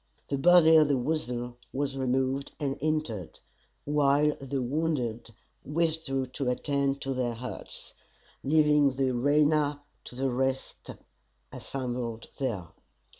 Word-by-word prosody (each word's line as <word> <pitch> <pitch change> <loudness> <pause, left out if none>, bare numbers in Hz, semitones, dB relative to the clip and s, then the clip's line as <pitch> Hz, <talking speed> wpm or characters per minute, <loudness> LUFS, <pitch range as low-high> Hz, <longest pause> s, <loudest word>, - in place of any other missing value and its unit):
The 140 - 0
body 160 0 +7
of 155 -2 +6
The 140 -2 +2
Weasel 125 -3 -2
was 135 0 -2
removed, 130 +1 -1
and 140 -2 -1
interred, 145 - -2 0.4
while 145 0 +3
the 135 0 -3
wounded 125 -4 -2 0.3
withdrew 155 -3 0
to 130 +1 -3
attend 140 +1 0
to 135 - -2
their 125 -2 -1
hurts; 125 +2 -7 0.5
leaving 150 -1 +4
the 130 0 +1
arena 145 +3 +2 0.2
to - - -9
the 135 +1 0
rest 130 +1 -2 0.6
assembled 120 -3 -4
there. 110 -11 -2
135 Hz, 120 wpm, -28 LUFS, 125-150 Hz, 0.6 s, body